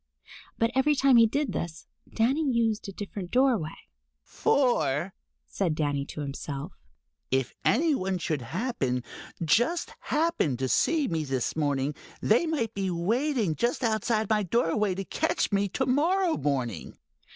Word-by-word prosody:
But 230 +1 +1
every 290 +3 +3
time 270 -2 +5
he 230 -1 +7
did 280 -2 -1
this, 170 -1 -5 0.3
Danny 260 +8 +1
used 225 -3 0
a - - -5
different 195 -2 -6
doorway. 240 - +2 0.5
"For," 195 - +1 0.3
said 175 -6 -1
Danny 145 -2 -1
to 150 - -6
himself, 140 +3 -5 0.6
"if 130 -1 0
any 310 +6 +3
one 190 -7 -1
should 155 -5 -2
happen, 130 - -2 0.4
just 240 - +2
happen, 300 - 0
to 130 +1 -1
see 305 - +2
me 160 -2 -1
this 135 -4 -2
morning, 145 -2 0 0.3
they 240 +10 +3
might 290 -8 -1
be 195 -1 -2
waiting 220 - 0
just 240 +9 -1
outside 220 -1 +1
my 215 0 +2
doorway 200 0 +1
to 195 +1 -4
catch - - 0
me 200 0 +1
to 265 +7 -1
morrow 330 +7 +2
morning." 125 - -2
205 Hz, 145 wpm, -27 LUFS, 155-255 Hz, 0.6 s, he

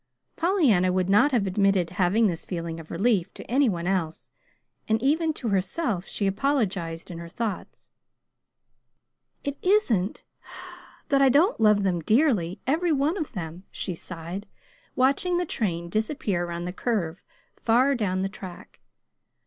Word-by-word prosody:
Pollyanna 290 - +3
would 185 +1 0
not 210 +9 +5
have 235 -6 +2
admitted 190 -2 +2
having 195 +4 +2
this 175 -5 -1
feeling 170 -2 -5
of 160 - -11
relief 195 0 +1
to - - -8
any 265 +1 +2
one 175 -3 -3
else, 175 -4 -2 0.6
and 220 0 +2
even 315 +4 +2
to 240 -6 -4
herself 195 - -1
she 205 - -2
apologized 195 - -1
in 170 - -7
her 170 0 -8
thoughts. 215 +1 -5 1.5
"It 285 0 -4
isn't 255 - +1 0.9
that 275 -1 +3
I 270 - +6
don't 315 - +3
love 210 -2 +5
them 180 -3 +1
dearly, 215 - +2
every 325 +6 +1
one 295 +3 +1
of 315 -8 -4
them," 175 -2 -6
she 185 - -4
sighed, 175 +3 -7 0.5
watching 280 +8 +2
the 355 - 0
train 170 - -2
disappear 215 - -1
around 170 0 -5
the 180 - -4
curve 185 -7 -2 0.3
far 250 +5 +3
down 190 -6 -1
the - - 0
track. 190 -2 -11
200 Hz, 150 wpm, -26 LUFS, 180-270 Hz, 1.5 s, I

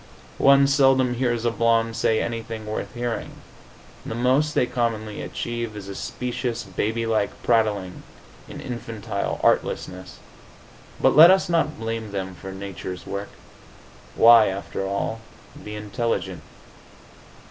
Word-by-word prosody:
One 140 0 +6
seldom 135 -2 +3
hears 120 -2 -1
a 120 - +2
blonde 115 0 +1
say 110 -1 +1
anything 115 -1 -5
worth 105 0 -4
hearing; 120 -1 -4 0.7
the - - -5
most 130 +5 +2
they - - +3
commonly 110 -3 -2
achieve 120 -2 -4
is 100 -2 -8
a 100 - -6
specious, 120 +2 -4
baby 110 +4 -2
like 110 -3 +1
prattling, 105 -6 +1 0.5
an - - -8
infantile 115 -4 -4
artlessness. 90 0 0 0.8
But - - +3
let 160 +4 +10
us 190 -1 +4
not 165 -3 +1
blame 115 -1 -4
them 95 -1 -4
for 95 +2 -9
nature's 95 -2 -7
work. 100 +1 -5 0.9
Why, 115 -1 +7
after 95 0 -4
all, 100 +3 -2 0.4
be 105 0 -7
intelligent? 105 -4 -3
115 Hz, 125 wpm, -24 LUFS, 100-120 Hz, 0.9 s, let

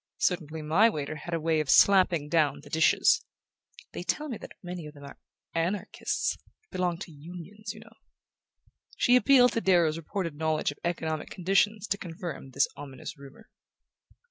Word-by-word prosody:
Certainly 160 -3 -1
my 180 +10 +4
waiter 155 -6 -4
had 170 +3 -4
a - - -1
way 160 0 +1
of 155 -3 -2
slapping 185 -3 +5
down 150 -3 +1
the - - -14
dishes... 160 - +4 0.7
they - - -5
tell 300 0 -2
me 240 - -4
that - - -11
many 175 -3 -6
of 150 - -12
them 145 - -13
are 140 - -11 0.3
Anarchists... 175 +5 -1 0.3
belong 180 -2 -1
to 175 - -8
Unions, 180 +7 -9
you 215 - -12
know." 225 0 -16 1.0
She 245 - +4
appealed 250 -1 +6
to 230 - 0
Darrow's 170 -5 +3
reported 170 0 -4
knowledge 155 0 0
of 145 - -13
economic 160 -3 -2
conditions 195 +3 +1
to 200 -1 -2
confirm 165 -4 -7
this 135 +2 +2
ominous 135 -2 -8
rumour. 140 -1 -15
170 Hz, 165 wpm, -28 LUFS, 155-195 Hz, 1.0 s, appealed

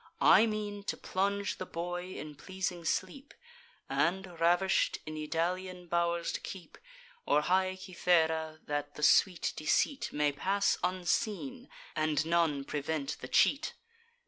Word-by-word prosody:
I 230 - +7
mean 210 -1 -3
to - - -2
plunge 200 +2 -1
the 185 - -3
boy 175 +2 -4
in 150 0 -7
pleasing 180 +2 -4
sleep, 190 - -3 0.5
And, 180 0 -1
ravish'd, 175 +3 +3
in 155 0 -6
Idalian 180 +4 -2
bow'rs 170 0 +1
to - - -3
keep, 190 -3 -9 0.5
Or 150 - +4
high 185 +3 +1
Cythera, 160 -4 +1
that 145 0 -3
the 150 - -6
sweet 180 +3 +4
deceit 265 - +1
May 150 0 +1
pass 195 +8 +1
unseen, 210 +8 -1 0.3
and 155 0 +1
none 165 -4 +2
prevent 145 0 -3
the 130 - -6
cheat. 285 - +2
175 Hz, 130 wpm, -31 LUFS, 155-190 Hz, 0.5 s, I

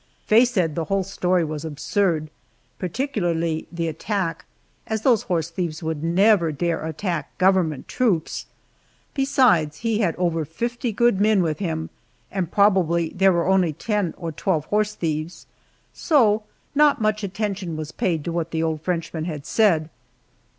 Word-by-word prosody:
Faye 225 +4 +6
said 185 -10 0
the 165 +1 -2
whole 195 +1 0
story 180 -2 0
was 155 -1 -5
absurd, 160 +1 -1 0.5
particularly 175 - -1
the 170 -1 -2
attack, 165 +1 -3 0.4
as 220 -1 -2
those 240 -6 +4
horse 170 -2 -2
thieves 165 -3 -4
would 160 -1 -3
never 175 0 +4
dare 165 +3 -1
attack 160 -1 -4
government 185 -7 +2
troops. 220 -11 0 0.7
Besides, 250 - +3
he 225 -2 +1
had 180 -7 +1
over 170 -3 0
fifty 235 - -3
good 230 -2 +2
men 210 -3 +4
with 155 -3 -2
him, 160 -4 -3 0.4
and 185 -3 -2
probably 180 -5 +3
there 190 +1 +3
were 170 -1 +1
only 185 -4 +3
ten 205 0 -2
or 170 -2 -4
twelve 155 +1 -1
horse 210 +2 0
thieves. 155 -1 -3 0.5
So 220 - +3 0.3
not 295 -1 +4
much 215 -1 0
attention 195 -4 -3
was 155 0 -5
paid 165 -5 -1
to 170 - -3
what 165 -1 -2
the 165 -1 -1
old 160 -2 -1
Frenchman 165 -2 -3
had 150 -4 -5
said. 170 -8 +3
175 Hz, 150 wpm, -23 LUFS, 160-210 Hz, 0.7 s, Faye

